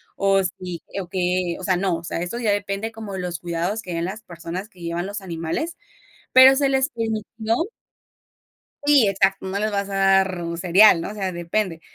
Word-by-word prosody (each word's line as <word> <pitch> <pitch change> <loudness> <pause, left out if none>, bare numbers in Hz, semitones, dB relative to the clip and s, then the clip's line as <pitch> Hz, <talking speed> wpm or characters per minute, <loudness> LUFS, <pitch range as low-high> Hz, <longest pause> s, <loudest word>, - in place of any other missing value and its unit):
o 195 0 +3
si 180 -2 -5 0.2
o 180 - -9
qué, 180 -2 0
o - - -9
sea, 185 - +2
no, 185 -1 0
o 165 - -10
sea, - - -3
eso 205 +7 -4
ya 220 -3 +1
depende 205 +2 -2
como 220 -2 -7
de 190 - -4
los 175 -2 -4
cuidados 175 +5 -2
que 180 - -7
den 170 0 -1
las 210 +4 -5
personas 175 +3 -7
que 185 - -21
llevan 170 +1 -3
los 205 +1 -4
animales, 175 - -4 0.6
pero 260 +1 +9
se 280 0 +3
les 265 +1 +2
permitió 225 -1 -2 1.3
Sí, 285 -7 +6
exacto, 195 0 +1
no 190 +1 -2
les 215 +1 0
vas 200 -1 -2
a 195 - -4
dar 195 -2 +3
un 170 0 -4
cereal, 180 +1 +6
¿no?, - - -4
o - - -8
sea, 190 -3 -3
depende. 170 0 -2
195 Hz, 205 wpm, -22 LUFS, 175-215 Hz, 1.3 s, pero